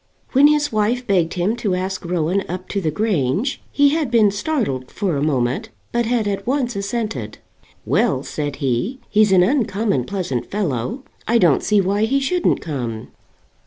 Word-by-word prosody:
When 275 +2 +6
his 295 0 +2
wife 225 +3 0
begged 180 -5 +1
him 185 +5 0
to 205 -6 0
ask 185 +1 -3
Rowan 175 +2 0
up 185 +1 -5
to 200 - -1
the 160 - 0
Grange, 195 - 0
he 285 0 +4
had 305 -2 0
been 220 -4 +4
startled 205 - -2
for 195 -6 -2
a 140 - -1
moment, 145 - 0 0.2
but 235 -1 0
had 230 -3 +1
at 200 0 -3
once 255 -2 0
assented. 200 - -3 0.5
"Well," - - +1
said 145 -2 -4
he; 140 - -1
"he's 210 -1 +4
an 185 -2 +6
uncommon 215 - +1
pleasant 175 -11 -3
fellow. 200 - -2 0.2
I 235 - +4
don't 175 -10 +4
see 210 -1 +3
why 200 +3 +1
he 270 +5 +1
shouldn't 345 +6 +1
come." 120 -8 -4
200 Hz, 170 wpm, -20 LUFS, 160-235 Hz, 0.5 s, When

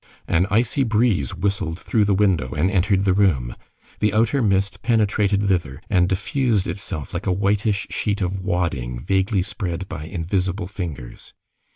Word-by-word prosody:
An 90 +3 +2
icy 115 +6 +1
breeze 110 - +1
whistled 95 -4 -1
through 105 +1 +1
the 100 -1 +2
window 95 -11 +1
and 85 +6 +1
entered 100 0 +2
the 95 - +3
room. 85 -12 +1 0.4
The 105 -1 +1
outer 115 +5 +2
mist 100 -3 +1
penetrated 105 -3 +2
thither 85 -8 0
and 90 -2 +3
diffused 110 +1 0
itself 80 -7 -5
like 90 +4 -4
a - - +3
whitish 100 +2 +1
sheet 105 -2 -1
of 95 0 -2
wadding 80 -11 -1
vaguely 95 - +1
spread 95 -3 -4
by 75 -5 -6
invisible 90 +2 -2
fingers. 85 -10 -7
95 Hz, 155 wpm, -22 LUFS, 90-105 Hz, 0.4 s, the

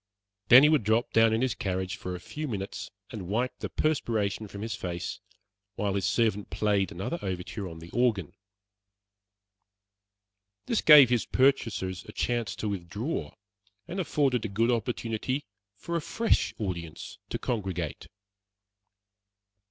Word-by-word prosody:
Then 130 +3 +10
he 150 - +7
would 155 -7 +3
drop 110 +3 +1
down 115 0 +5
in 110 +3 +1
his 130 -4 +1
carriage 95 0 -2
for 90 0 -5
a - - -6
few 150 +11 -6
minutes 100 -5 -5 0.2
and 100 -6 -6
wipe 120 +6 -1
the - - -4
perspiration 110 -9 0
from 100 +1 -7
his 115 - -3
face, 85 -1 -4 0.6
while 100 -1 -1
his 100 -1 0
servant 110 -4 +1
played 100 -3 +1
another 100 - -4
overture 95 +1 -4
on 80 - -9
the 85 +1 -11
organ. 115 -9 +1 2.3
This 230 - +1
gave 145 -5 +9
his 120 -2 +1
purchasers 105 -9 +1
a - - -10
chance 120 -3 -1
to 110 - -3
withdraw, 100 - -4 0.5
and 185 - -4
afforded 140 - +1
a - - -1
good 115 +4 +1
opportunity 120 +3 -2 0.3
for 170 +11 -5
a 170 - 0
fresh 230 +8 +1
audience 85 -6 -5
to - - -2
congregate. 95 - -3
110 Hz, 145 wpm, -28 LUFS, 95-125 Hz, 2.3 s, Then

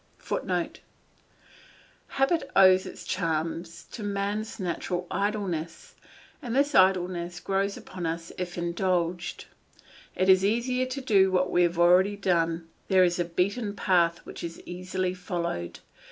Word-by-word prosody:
[Footnote: - - -3 1.4
Habit 270 +5 +1
owes 185 -1 +6
its - - -9
charm 165 0 -1 0.3
to 235 - -7
man's 205 +2 -3
natural 180 0 -3
idleness, 190 -5 -3 0.5
and 245 -4 -4
this 285 +2 +2
idleness 180 -3 +2
grows 195 +1 -1
upon 180 -3 -6
us 165 +1 -4
if 180 -1 -4
indulged; 175 0 -1 0.7
it 185 - +1
is 190 0 +6
easier 250 +5 +1
to 265 +2 -4
do 195 -6 +4
what 185 0 +1
we 175 - +3
have 175 -1 +2
already 180 +4 +5
done, 170 -3 0 0.2
there 190 -1 +5
is 175 0 +1
a 175 - +1
beaten 200 +5 -1
path 175 -4 +2
which - - -9
is 165 -1 -6
easily 185 +1 -3
followed. 170 - -4
185 Hz, 135 wpm, -27 LUFS, 175-200 Hz, 1.4 s, owes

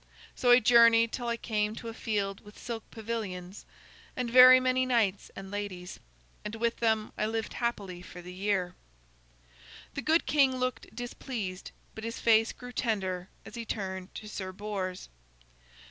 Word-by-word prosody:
So 245 - 0
I 245 +1 +9
journeyed 230 -1 +6
till 240 -2 -4
I 235 0 0
came 215 -2 -1
to 230 - -8
a 225 - -5
field 200 -3 -2
with 210 0 -14
silk 230 -2 -6
pavilions 205 -5 -6 0.5
and 245 -2 -2
very 255 +1 +10
many 255 0 +2
knights 225 -6 +1
and 195 0 -8
ladies. 195 -3 -5 0.4
And 210 +1 -5
with 230 +1 -1
them 220 -2 +1
I 215 - +1
lived 225 0 -3
happily 200 -7 -3
for 180 - -11
the 180 +1 -9
year." 190 -2 -1 1.2
The 280 - -4
good 320 +3 +2
king 275 -3 +3
looked 255 -3 -3
displeased, 230 -5 -5 0.2
but 220 - -9
his 230 0 -4
face 225 -1 +4
grew 245 0 -10
tender 190 -7 -2 0.2
as - - -11
he 235 - -5
turned 190 -4 -5
to 215 - -7
Sir 190 -3 -5
Bors. 190 -2 -5
220 Hz, 160 wpm, -29 LUFS, 195-235 Hz, 1.2 s, very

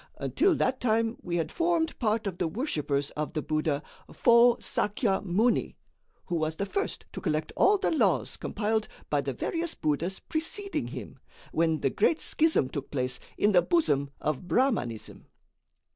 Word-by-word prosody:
Until 380 -3 +2
that 260 -2 0
time 225 -1 +1
we 175 -1 -3
had 165 -2 -1
formed 335 -1 0
part 220 -2 +1
of 185 -3 -4
the 175 - +1
worshippers 150 - -1
of 150 0 -4
the 155 - -1
Buddha, 155 -1 -1 0.3
Fô 235 0 +5
Sakya 210 -2 0
Muni, 205 +6 +1 0.5
who 175 - -1
was 155 0 -1
the 200 - -2
first 400 - -3
to - - -6
collect 155 -3 -1
all 410 +1 +5
the - - 0
laws 225 - +2
compiled 215 +1 -1 0.2
by - - +2
the - - -3
various 335 0 -2
buddhas 160 +5 -1
preceding 390 +5 -3
him, - - -8 0.3
when 160 -1 +1
the 135 - +1
great 325 - +2
schism 315 - +2
took 140 +1 -6
place 125 -2 -2 0.2
in 210 - +3
the 180 -3 +6
bosom 145 - +1
of 155 +3 -2
Brahmanism. 165 - -1
200 Hz, 160 wpm, -28 LUFS, 155-260 Hz, 0.5 s, the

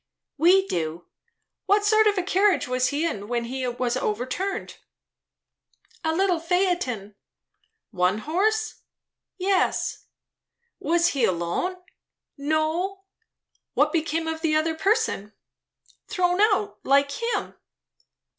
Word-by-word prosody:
"We 360 +6 +5
do. 165 - -3 0.6
What 410 +1 +3
sort 435 +1 +5
of 410 -1 +2
a 370 - +1
carriage 385 -6 +2
was 255 0 +1
he 295 +4 -1
in 205 -11 -3
when 240 0 -1
he 255 +1 -3
was 245 0 -1
overturned?" 260 - -3 1.3
"A 320 - +1
little 360 0 +1
phaeton." 330 - -1 0.8
"One 180 +3 +1
horse?" 425 - -1 0.6
"Yes." 385 0 0 0.7
"Was 340 +1 +2
he 270 -4 -1
alone?" 175 - 0 0.6
"No." 315 +6 -1 0.7
"What - - +3
became 325 0 -1
of 320 0 -3
the 315 -2 +1
other 315 +1 +1
person?" 320 - 0 0.7
"Thrown 365 -2 +1
out, 410 -1 +2
like 280 +1 +3
him." 465 +10 -2
320 Hz, 110 wpm, -25 LUFS, 255-385 Hz, 1.3 s, We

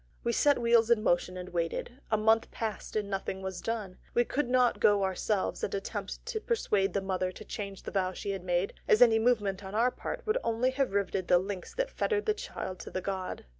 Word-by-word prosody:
We 235 - +1
set 290 +4 +4
wheels 235 -1 +4
in 230 -3 +4
motion, 180 -1 +1
and 180 0 -6
waited. 170 +9 -3
A 220 - +3
month 220 +1 +3
passed 220 -2 -5
and 210 -2 0
nothing 190 -1 -3
was 190 -2 -4
done. 215 -5 -4 0.2
We 240 - +4
could 275 0 -1
not 250 -1 +3
go 205 -1 +4
ourselves 190 +1 -1
and 200 - -1
attempt 195 - -5
to 465 -2 -2
persuade 210 - +1
the 200 - 0
mother 185 -1 -1
to 215 - -11
change 200 -2 -6
the - - -6
vow 185 -2 +1
she 200 +2 -4
had 195 -2 -4
made, 180 +1 0
as 220 - +7
any 225 -2 +5
movement 205 -5 +1
on 190 +2 -7
our 240 +3 +3
part - - -6
would 435 +3 +1
only 230 +3 +1
have 265 -5 0
riveted 195 -2 0
the 180 - +6
links 185 0 -4
that - - -1
fettered 425 -2 0
the 430 - +3
child 185 - -6
to - - -7
the - - -3
god. 190 -1 -4
205 Hz, 225 wpm, -30 LUFS, 190-240 Hz, 0.2 s, as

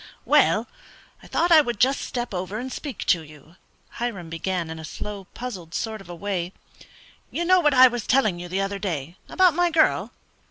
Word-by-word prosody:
"Well, - - +4 0.5
I - - -14
thought 345 +1 +1
I 320 -2 +9
would 240 -7 -4
just 265 +2 +3
step 240 -3 -4
over 185 +3 -4
and 255 +3 -5
speak 285 -4 -6
to 175 - +3
you," 155 +2 -16 0.4
Hiram 200 -9 -4
began, 170 0 -3
in 160 - -7
a - - -8
slow, 200 +5 -7
puzzled 185 -10 -7
sort 220 -2 -3
of 195 - -15
a 175 - -6
way. 185 -1 -3 0.8
"You 345 - -2
know 370 +1 +5
what 295 -5 +3
I 255 0 +9
was 240 -3 -4
telling 215 -9 +2
you 175 - -6
the 190 +2 -1
other 195 0 -3
day 170 -3 -4
about 370 -3 +4
my 350 +2 +2
girl?" 315 -1 +2
205 Hz, 200 wpm, -24 LUFS, 175-260 Hz, 0.8 s, I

